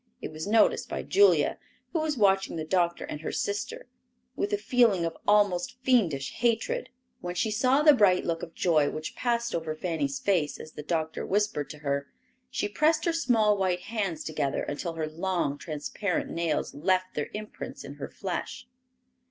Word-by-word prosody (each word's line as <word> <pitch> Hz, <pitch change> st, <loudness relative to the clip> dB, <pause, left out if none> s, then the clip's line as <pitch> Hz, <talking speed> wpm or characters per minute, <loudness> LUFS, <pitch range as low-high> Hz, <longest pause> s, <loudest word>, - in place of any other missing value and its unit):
It -, -, -6 dB
was 155 Hz, +2 st, -6 dB
noticed 220 Hz, +2 st, +3 dB
by -, -, -3 dB
Julia, 405 Hz, +1 st, +4 dB, 0.3 s
who 330 Hz, -, +1 dB
was 310 Hz, -3 st, -1 dB
watching 195 Hz, -4 st, +3 dB
the 160 Hz, -1 st, -3 dB
doctor 175 Hz, 0 st, +1 dB
and 150 Hz, -, -6 dB
her -, -, -3 dB
sister 205 Hz, 0 st, -3 dB, 0.5 s
with 205 Hz, -, -1 dB
a 205 Hz, -, +2 dB
feeling 210 Hz, -4 st, +3 dB
of 165 Hz, 0 st, -3 dB
almost 205 Hz, -2 st, +3 dB
fiendish 175 Hz, -, +2 dB
hatred. 240 Hz, -, 0 dB, 0.3 s
When 175 Hz, -6 st, -5 dB
she 215 Hz, +4 st, 0 dB
saw 255 Hz, +6 st, +3 dB
the 300 Hz, -1 st, +8 dB
bright 200 Hz, -8 st, +4 dB
look 165 Hz, -1 st, -1 dB
of 165 Hz, -, -8 dB
joy 155 Hz, -5 st, +3 dB
which 155 Hz, 0 st, -6 dB
passed 235 Hz, -1 st, 0 dB
over 160 Hz, -2 st, -2 dB
Fanny's 185 Hz, -, -2 dB
face 190 Hz, -, 0 dB
as 155 Hz, -, -9 dB
the 150 Hz, -, -8 dB
doctor 160 Hz, 0 st, -2 dB
whispered 200 Hz, -7 st, 0 dB
to 150 Hz, -, -8 dB
her, 140 Hz, 0 st, 0 dB, 0.4 s
she 250 Hz, -5 st, -1 dB
pressed 310 Hz, +9 st, +2 dB
her 335 Hz, -, +2 dB
small 225 Hz, -10 st, +3 dB
white 180 Hz, -2 st, +1 dB
hands 195 Hz, -7 st, -3 dB
together 150 Hz, -3 st, -1 dB
until 165 Hz, +3 st, -4 dB
her 160 Hz, -1 st, -2 dB
long 165 Hz, -3 st, -1 dB
transparent 155 Hz, +6 st, -3 dB
nails 165 Hz, -2 st, -1 dB
left 185 Hz, +5 st, 0 dB
their 150 Hz, -, -3 dB
impress 210 Hz, 0 st, -7 dB
in -, -, -8 dB
her -, -, -4 dB
flesh! -, -, -5 dB
185 Hz, 175 wpm, -28 LUFS, 160-225 Hz, 0.5 s, the